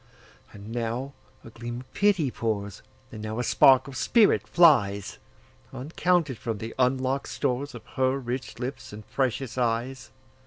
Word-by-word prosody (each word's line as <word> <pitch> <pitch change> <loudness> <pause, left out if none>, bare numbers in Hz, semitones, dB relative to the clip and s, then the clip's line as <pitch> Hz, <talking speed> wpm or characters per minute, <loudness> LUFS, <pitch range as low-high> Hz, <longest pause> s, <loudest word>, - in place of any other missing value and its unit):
And 105 +1 -11
now 120 +4 -3 0.3
a 115 - -12
gleam 120 +1 -6
of 130 - -19
pity 190 -10 +2
pours, 100 -4 -3 0.3
And 110 - -8
now 110 +1 -4
a 125 - -1
spark 130 +1 +5
of 135 - -9
spirit 220 - +3
flies, 105 - +3 0.5
Uncounted, 155 -1 0
from 115 -2 -3
the 110 +2 -6
unlock'd 130 +1 +1
storesOf 125 -2 -3
her 130 +1 +2
rich 130 0 -5
lips 130 +1 -6
and 105 0 -10
precious 130 -1 -1
eyes. 125 +2 -1
125 Hz, 145 wpm, -26 LUFS, 115-135 Hz, 0.5 s, spark